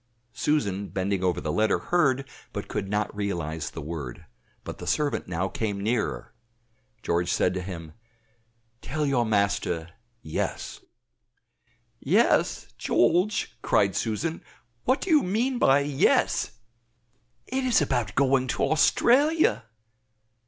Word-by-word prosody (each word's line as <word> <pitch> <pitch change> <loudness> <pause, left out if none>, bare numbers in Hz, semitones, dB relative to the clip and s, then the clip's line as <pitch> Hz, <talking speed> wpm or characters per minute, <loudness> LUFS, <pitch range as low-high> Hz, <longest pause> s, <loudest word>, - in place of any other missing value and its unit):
Susan, 105 -6 0
bending 95 0 -2
over 90 -2 +1
the 75 - -3
letter, 110 +6 +2
heard, 140 -6 +1 0.3
but - - -5
could 95 - -3
not 105 0 -1
realize 85 -7 -3
the 80 - -8
word, 75 -6 -6 0.4
but - - -7
the 90 - -7
servant 145 - 0
now 90 +2 -1
came 105 -1 -3
nearer. 110 +3 -2 0.7
George 85 +1 0
said 90 - +2
to 95 - -3
him, 85 -4 -7 0.9
"Tell 150 +3 -2
your 125 -5 +1
master, 100 -5 0 0.3
Yes." 80 - -4 1.2
"Yes? - - +2
George!" 175 - +1
cried 100 -2 +2
Susan, 155 +10 -2 0.4
"what 260 +2 +2
do 375 - -2
you 305 -2 +6
mean 240 +6 0
by 135 +1 +5
yes? 140 -1 +2 0.9
It 265 +1 -2
is 255 -2 +3
about 120 -8 -1
going 135 -1 +3
to - - -1
Australia." 250 - +3
110 Hz, 125 wpm, -26 LUFS, 95-150 Hz, 1.2 s, you